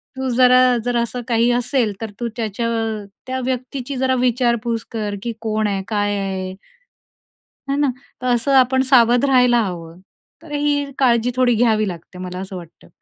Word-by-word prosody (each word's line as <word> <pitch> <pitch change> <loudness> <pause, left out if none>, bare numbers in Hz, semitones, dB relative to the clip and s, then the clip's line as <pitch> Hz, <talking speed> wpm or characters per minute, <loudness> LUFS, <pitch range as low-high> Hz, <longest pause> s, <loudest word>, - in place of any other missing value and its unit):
तू 265 0 -3
जरा, 255 0 +5
जर 245 -1 0
असं 235 +1 -2
काही 235 0 +2
असेल, 245 -2 0
तर 220 -2 -5
तू 240 - -2
त्याच्या 225 +1 -2 0.6
त्या 260 0 -2
व्यक्तीची 255 +1 -4
जरा 260 0 +1
विचारपूस 235 -2 0
कर 210 -3 -3
की 235 -1 -3
कोण 215 -1 0
आहे? 195 -1 -1
काय 205 -1 0
आहे? 190 -1 -3 1.2
है 275 - +1
ना, 290 -2 +2 0.3
तर 255 - -2
असं 250 +4 0
आपण 260 +1 +3
सावध 245 0 +5
राहायला 250 -3 +4
हवं 170 -3 -7 0.4
तर 320 - -13
ही 290 -1 0
काळजी 245 -2 +2
थोडी 255 -1 +3
घ्यावी 215 -2 +2
लागते 175 0 -8
मला 180 0 -6
असं 190 0 -7
वाटतं. 170 -2 -12
240 Hz, 165 wpm, -20 LUFS, 210-255 Hz, 1.2 s, जरा